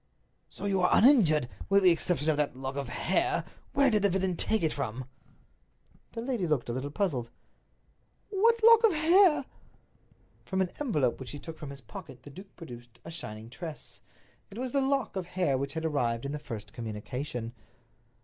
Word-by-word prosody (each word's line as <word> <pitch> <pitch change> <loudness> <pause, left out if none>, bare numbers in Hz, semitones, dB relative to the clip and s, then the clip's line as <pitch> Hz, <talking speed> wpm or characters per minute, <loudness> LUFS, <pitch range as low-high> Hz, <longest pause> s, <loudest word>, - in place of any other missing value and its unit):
"So - - -8
you 195 -2 +1
are 180 - +4
uninjured, 185 - +5 0.2
with 200 0 +4
the 180 - +7
exception 165 -2 +1
of 150 - -1
that 150 -3 0
lock 135 +1 -5
of 140 -3 -4
hair. 355 - 0 0.3
Where 280 -2 +4
did 210 -2 +3
the 200 - +4
villain 190 -1 0
take 220 +4 0
it 160 - +1
from?" 130 -2 -4 1.1
The 230 - -4
lady 240 -8 -1
looked 145 -6 0
a - - -1
little 130 +3 -3
puzzled. 145 - -1 1.0
"What 455 +3 +3
lock 460 0 +8
of 445 -5 +5
hair?" 320 -2 +5 1.0
From 190 - -3
an 185 -2 +1
envelope 150 - 0
which 130 - -7
he 145 - -6
took 160 +2 -9
from 150 - -7
his 140 -1 -9
pocket 135 - -11
the 145 - -11
duke 190 +6 -13
produced 120 -7 -11
a - - -7
shining 110 -8 -7
tress. 150 +7 -8 0.5
It 200 - -11
was 255 0 -3
the 275 - +2
lock 270 -5 0
of 185 -2 -3
hair 180 -6 0
which 135 +3 -3
had 160 0 -2
arrived 120 -6 0
in 140 - -3
the 150 - -4
first 115 -8 -8
communication. 120 +2 -5
160 Hz, 190 wpm, -29 LUFS, 130-220 Hz, 1.1 s, lock